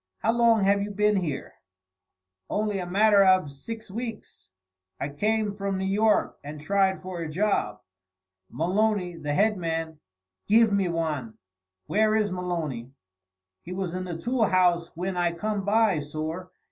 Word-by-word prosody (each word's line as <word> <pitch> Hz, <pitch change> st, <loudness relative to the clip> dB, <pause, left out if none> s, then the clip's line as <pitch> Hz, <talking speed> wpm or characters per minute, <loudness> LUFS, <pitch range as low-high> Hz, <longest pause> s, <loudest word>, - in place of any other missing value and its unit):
"How 225 Hz, -, +1 dB
long 230 Hz, -2 st, +4 dB
have 200 Hz, +1 st, +3 dB
you 205 Hz, -, -3 dB
been 210 Hz, 0 st, +2 dB
here?" 160 Hz, -7 st, -3 dB, 1.0 s
"Only 210 Hz, -1 st, -1 dB
a 180 Hz, -, -4 dB
matter 200 Hz, +2 st, +5 dB
av 185 Hz, -6 st, +4 dB
six 220 Hz, +10 st, -8 dB
weeks. 225 Hz, -, -7 dB, 0.5 s
I 140 Hz, -, -2 dB
came 210 Hz, +7 st, 0 dB
from 200 Hz, -1 st, -3 dB
New 190 Hz, -, -2 dB
York 210 Hz, +3 st, +2 dB
and 150 Hz, +1 st, -7 dB
tried 190 Hz, +4 st, +1 dB
for 185 Hz, -2 st, -5 dB
a 165 Hz, -, -4 dB
job. 155 Hz, -, 0 dB, 0.7 s
Maloney, 185 Hz, +1 st, 0 dB
the 150 Hz, -3 st, -3 dB
head 210 Hz, +5 st, +2 dB
man, 165 Hz, -2 st, -3 dB, 0.5 s
giv 220 Hz, 0 st, +5 dB
me 195 Hz, -3 st, +2 dB
wan." 155 Hz, -9 st, -3 dB, 0.5 s
"Where 215 Hz, -, +2 dB
is 210 Hz, -2 st, +1 dB
Maloney?" 165 Hz, -10 st, -3 dB, 0.7 s
"He 180 Hz, -, -7 dB
was 185 Hz, -2 st, -3 dB
in 185 Hz, 0 st, -3 dB
the 175 Hz, -2 st, -5 dB
tool 235 Hz, +5 st, +1 dB
house 175 Hz, -3 st, +3 dB
whin 180 Hz, +3 st, -3 dB
I 175 Hz, -1 st, +1 dB
come 200 Hz, +3 st, -3 dB
by, 210 Hz, -4 st, +3 dB
sorr. 155 Hz, +5 st, -5 dB
190 Hz, 155 wpm, -26 LUFS, 165-210 Hz, 1.0 s, matter